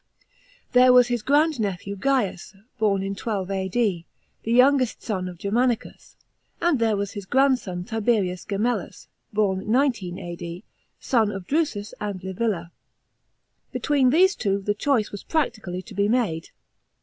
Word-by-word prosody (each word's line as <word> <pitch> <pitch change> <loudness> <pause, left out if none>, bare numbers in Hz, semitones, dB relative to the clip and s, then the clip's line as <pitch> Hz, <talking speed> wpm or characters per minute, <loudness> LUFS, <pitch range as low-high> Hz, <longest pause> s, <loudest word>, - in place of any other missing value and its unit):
There 250 0 +6
was 250 -1 +6
his 240 -2 0
grand 295 +3 +2
nephew 200 -1 -3
Gains 205 -5 -1 0.2
(born 200 -3 +2
in 195 0 -3
12 195 -3 -3
A.D,), 190 -2 -1 0.4
the 225 - -3
youngest 255 0 +4
son 185 -5 -2
of 175 - -10
Germanicus, 230 +5 -1 0.4
and 340 -6 +2
there 220 -2 +2
was 200 0 -2
his 200 -3 -8
grandson 250 -9 +1
Tiberius 205 -4 0
Gemellus 215 +5 -2 0.2
(born 205 -1 0
19 235 -9 +1
A.D.), 175 +1 -7 0.4
son 225 -5 +2
of 195 -3 -6
Drusus 275 - -1
and 200 -3 -4
Li 190 - -4
villa. 185 -4 -2 1.0
Between 280 -4 +2
these 370 +8 +5
two 195 -1 0
the 205 +1 0
choice 220 0 0
was 205 - -7
practically 215 - -2
to 225 - -12
be 200 +1 +1
made. 215 -10 0
210 Hz, 145 wpm, -24 LUFS, 190-250 Hz, 1.0 s, There